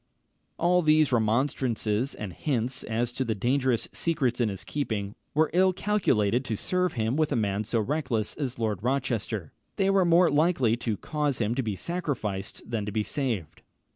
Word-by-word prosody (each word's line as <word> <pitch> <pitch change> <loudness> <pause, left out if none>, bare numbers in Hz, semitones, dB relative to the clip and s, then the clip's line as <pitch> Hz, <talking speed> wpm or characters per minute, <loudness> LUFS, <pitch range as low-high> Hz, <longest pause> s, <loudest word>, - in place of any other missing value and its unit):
] - - -47
All 180 +1 +3
these 155 -3 +4
remonstrances, 115 0 +1
and 100 -4 -6
hints 130 - -1
as 115 +2 -1
to 130 +2 -2
the 115 -3 -1
dangerous 125 +2 +1
secrets 130 -7 0
in 115 - +2
his 95 -2 -6
keeping, 105 -8 -3 0.2
were 155 0 +3
ill 185 +1 +4
calculated 130 - +1
to 110 - -2
serve 180 - 0
him 115 +2 0
with 155 0 +1
a - - +1
man 105 -2 0
so 115 +1 0
reckless 125 -3 -1
as 135 -5 -4
Lord 110 -5 -1
Rochester: 120 - -2 0.2
they 195 0 +2
were 195 -1 +4
more 170 0 +5
likely 145 -6 +3
to 115 -3 -2
cause 150 0 -1
him 110 0 +1
to 135 - 0
be 110 -5 -2
sacrificed 115 - -3
than 115 -3 -2
to - - -2
be 105 +1 0
saved. 110 - -3
120 Hz, 180 wpm, -27 LUFS, 110-150 Hz, 0.2 s, more